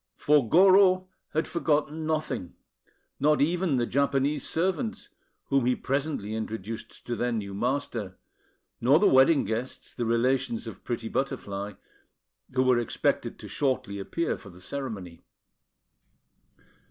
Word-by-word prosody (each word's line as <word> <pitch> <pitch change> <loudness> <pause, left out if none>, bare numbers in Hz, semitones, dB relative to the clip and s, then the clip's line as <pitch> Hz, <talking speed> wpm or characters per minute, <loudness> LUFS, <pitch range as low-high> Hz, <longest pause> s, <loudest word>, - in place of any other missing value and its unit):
For 145 -6 +3
Goro 185 - +6 0.2
had 155 - -1
forgotten 155 -1 0
nothing, 155 - -2 0.6
not 150 +2 +3
even 170 0 +2
the 120 -2 +1
Japanese 140 +2 0
servants, 190 +7 -1 0.4
whom 135 -3 +2
he 125 - +3
presently 135 -6 -2
introduced 110 0 -6
to 120 - -2
their 120 +1 -1
new 105 -4 -3
master; 120 -4 -2 0.6
nor 135 +5 +6
the 200 - +3
wedding 135 +1 +5
guests, 115 +5 -4
the 120 - -2
relations 120 +1 +1
of 115 - -9
pretty 115 -2 -3
Butterfly, 105 -7 -3 0.8
who 130 0 +2
were 130 -2 +4
expected 120 - -1
to - - -10
shortly 130 -8 -1
appear 165 +12 -2
for 100 - -12
the 90 -1 -14
ceremony. 100 -7 -6
130 Hz, 130 wpm, -27 LUFS, 115-150 Hz, 0.8 s, Goro